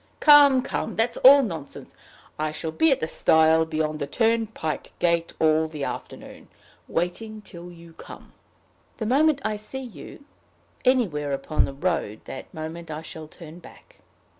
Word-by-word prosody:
Come, 285 Hz, -4 st, +7 dB
come! -, -, -4 dB
that's 225 Hz, +2 st, 0 dB
all 275 Hz, +2 st, +8 dB
nonsense. 165 Hz, -, -7 dB, 0.5 s
I 155 Hz, 0 st, -1 dB
shall 160 Hz, +1 st, -5 dB
be 320 Hz, -, +2 dB
at 265 Hz, -, +1 dB
the 160 Hz, -, -1 dB
stile 160 Hz, 0 st, +3 dB
beyond 155 Hz, -1 st, -2 dB
the 140 Hz, -, -3 dB
turnpike 225 Hz, -4 st, -1 dB
gate 170 Hz, -1 st, 0 dB
all 160 Hz, 0 st, +3 dB
the 155 Hz, -3 st, -7 dB
afternoon -, -, -8 dB, 0.4 s
waiting 210 Hz, +6 st, -3 dB
till 175 Hz, -2 st, -11 dB
you 170 Hz, -1 st, -14 dB
come." -, -, -13 dB, 0.6 s
"The 220 Hz, -, -4 dB
moment 280 Hz, +4 st, +2 dB
I 215 Hz, -1 st, -1 dB
see 265 Hz, +6 st, -8 dB
you 255 Hz, +3 st, -11 dB, 0.6 s
anywhere 180 Hz, -, +1 dB
upon 140 Hz, +3 st, 0 dB
the 140 Hz, -, -7 dB
road 140 Hz, -, -2 dB
that 130 Hz, -, -9 dB
moment 160 Hz, +2 st, -7 dB
I 155 Hz, +1 st, -6 dB
shall 160 Hz, -1 st, -9 dB
turn 165 Hz, +1 st, -12 dB
back. -, -, -17 dB
170 Hz, 155 wpm, -24 LUFS, 155-225 Hz, 0.6 s, all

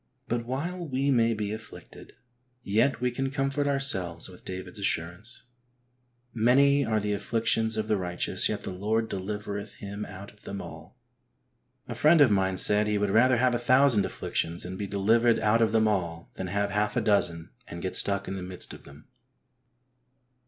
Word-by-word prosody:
But 120 Hz, 0 st, -2 dB
while 170 Hz, +7 st, -3 dB
we 135 Hz, 0 st, 0 dB
may 115 Hz, -3 st, +3 dB
be 105 Hz, -1 st, -3 dB
afflicted, 110 Hz, 0 st, -11 dB, 0.5 s
yet 115 Hz, +8 st, +1 dB
we 125 Hz, 0 st, +1 dB
can 135 Hz, +2 st, -2 dB
comfort 140 Hz, +1 st, -1 dB
ourselves 95 Hz, -13 st, 0 dB
with 90 Hz, -, -14 dB
David's 95 Hz, +3 st, -7 dB
assurance, 95 Hz, +4 st, -1 dB, 0.5 s
'' 125 Hz, 0 st, -44 dB, 0.2 s
Many 140 Hz, +2 st, +5 dB
are 110 Hz, -1 st, 0 dB
the 105 Hz, 0 st, -1 dB
afflictions 110 Hz, +1 st, 0 dB
of 110 Hz, 0 st, -1 dB
the 105 Hz, -1 st, +1 dB
righteous, 90 Hz, -2 st, 0 dB
yet -, -, -3 dB
the -, -, -5 dB
Lord 110 Hz, +4 st, -1 dB
delivereth 105 Hz, +1 st, -5 dB
him 100 Hz, +1 st, -6 dB
out 95 Hz, +1 st, -10 dB
of 105 Hz, -, -25 dB
them 100 Hz, -, -6 dB
all." -, -, -10 dB, 0.9 s
A -, -, -4 dB
friend 155 Hz, +2 st, +4 dB
of 140 Hz, -6 st, +6 dB
mine 95 Hz, -2 st, +1 dB
said 105 Hz, +3 st, +3 dB
he 105 Hz, 0 st, +1 dB
would 100 Hz, -1 st, 0 dB
rather 120 Hz, +4 st, +4 dB
have 125 Hz, +1 st, +2 dB
a 120 Hz, -, 0 dB
thousand 130 Hz, -2 st, +4 dB
afflictions 85 Hz, +2 st, -3 dB
and 90 Hz, +1 st, -6 dB
be 100 Hz, +1 st, -4 dB
delivered 115 Hz, +4 st, +3 dB
out 110 Hz, +2 st, +2 dB
of 110 Hz, -2 st, +3 dB
them 110 Hz, -1 st, +3 dB
all, 85 Hz, -5 st, -2 dB
than 95 Hz, -, -5 dB
have 100 Hz, +2 st, -1 dB
half 105 Hz, +2 st, 0 dB
a -, -, +3 dB
dozen 90 Hz, -6 st, 0 dB, 0.2 s
and 85 Hz, 0 st, -8 dB
get 95 Hz, -, -3 dB
stuck 100 Hz, 0 st, 0 dB
in 95 Hz, -, -4 dB
the 95 Hz, -, -5 dB
midst 90 Hz, 0 st, -3 dB
of -, -, -13 dB
them. 70 Hz, +2 st, -15 dB
105 Hz, 185 wpm, -27 LUFS, 95-125 Hz, 0.9 s, of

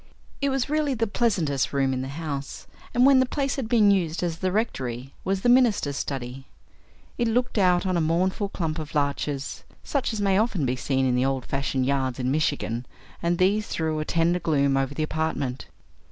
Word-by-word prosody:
It 280 Hz, -, +2 dB
was 265 Hz, -2 st, 0 dB
really 300 Hz, -2 st, 0 dB
the 225 Hz, -1 st, +1 dB
pleasantest 180 Hz, -, 0 dB
room 135 Hz, -1 st, +1 dB
in 130 Hz, -, -2 dB
the 130 Hz, -, -4 dB
house, 140 Hz, -1 st, -5 dB, 0.3 s
and 245 Hz, +1 st, +4 dB
when 275 Hz, -1 st, +7 dB
the 260 Hz, -, +4 dB
place 275 Hz, +1 st, -1 dB
had 255 Hz, -5 st, -4 dB
been 215 Hz, -4 st, +5 dB
used 175 Hz, -4 st, 0 dB
as 165 Hz, -2 st, -2 dB
the 185 Hz, -1 st, 0 dB
rectory, 130 Hz, -, -2 dB
was 190 Hz, 0 st, -1 dB
the -, -, +1 dB
minister's 240 Hz, -, +4 dB
study. 135 Hz, -1 st, -5 dB, 0.7 s
It 240 Hz, -, +2 dB
looked 235 Hz, 0 st, 0 dB
out 180 Hz, -1 st, +3 dB
on 185 Hz, -1 st, 0 dB
a 170 Hz, -, +2 dB
mournful 185 Hz, +5 st, 0 dB
clump 160 Hz, -4 st, -3 dB
of 155 Hz, 0 st, -7 dB
larches, 140 Hz, -1 st, -2 dB, 0.2 s
such 280 Hz, -4 st, -1 dB
as 220 Hz, -, -4 dB
may 195 Hz, -1 st, +3 dB
often 215 Hz, -, 0 dB
be 125 Hz, 0 st, 0 dB
seen 130 Hz, +1 st, 0 dB
in 125 Hz, -, +2 dB
the 125 Hz, +1 st, +2 dB
old 135 Hz, -2 st, -1 dB
fashioned 135 Hz, -1 st, -1 dB
yards 130 Hz, -2 st, 0 dB
in 130 Hz, 0 st, -1 dB
Michigan, 135 Hz, -5 st, -1 dB, 0.3 s
and 170 Hz, 0 st, +1 dB
these 200 Hz, +4 st, +2 dB
threw 160 Hz, -1 st, -1 dB
a -, -, -1 dB
tender 170 Hz, +2 st, +1 dB
gloom 140 Hz, -4 st, +2 dB
over 135 Hz, +1 st, -1 dB
the 155 Hz, -, -1 dB
apartment. 150 Hz, -5 st, -2 dB
160 Hz, 200 wpm, -25 LUFS, 135-205 Hz, 0.7 s, when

